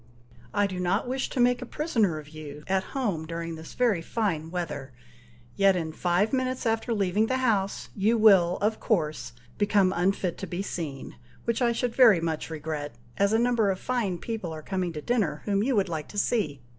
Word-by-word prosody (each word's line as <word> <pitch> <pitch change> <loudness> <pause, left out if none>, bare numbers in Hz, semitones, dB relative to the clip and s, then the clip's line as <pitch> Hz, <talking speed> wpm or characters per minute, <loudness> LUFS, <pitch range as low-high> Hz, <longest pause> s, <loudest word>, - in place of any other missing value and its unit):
"I 205 0 +2
do 185 -2 -4
not 180 +6 0
wish 260 +1 -2
to - - -4
make 245 +1 +3
a - - -4
prisoner 225 - 0
of 150 -1 -9
you 150 -1 -9
at 190 0 0
home 190 -12 -1
during 165 0 -4
this 160 0 -10
very 230 -9 +2
fine 165 -5 -2
weather, 155 -6 -4 0.6
yet 195 -1 +4
in 165 -3 -2
five 180 +7 +1
minutes 255 -1 -1
after 225 +1 0
leaving 205 0 +1
the 260 - 0
house, 210 -7 0
you 215 +4 +2
will, 190 -5 +6
of 215 +1 +1
course, 155 - -1 0.3
become 200 -2 +3
unfit 180 0 0
to 195 - -5
be 180 +2 -3
seen, 150 -8 -5 0.3
which 235 +1 0
I 240 -1 +3
should 235 0 -2
very 230 -9 +7
much 165 -1 -3
regret, 150 -4 -5 0.2
as 200 0 +3
a 220 - +4
number 235 -3 +2
of 190 -1 -1
fine 225 -8 -1
people 215 -3 -4
are 155 -1 -7
coming 185 -1 -2
to 150 -2 -6
dinner, 210 -11 0
whom 200 -1 +1
you 255 +3 +1
would 200 -2 +2
like 155 -3 -4
to 205 - -10
see. 165 - 0
195 Hz, 200 wpm, -27 LUFS, 165-225 Hz, 0.6 s, very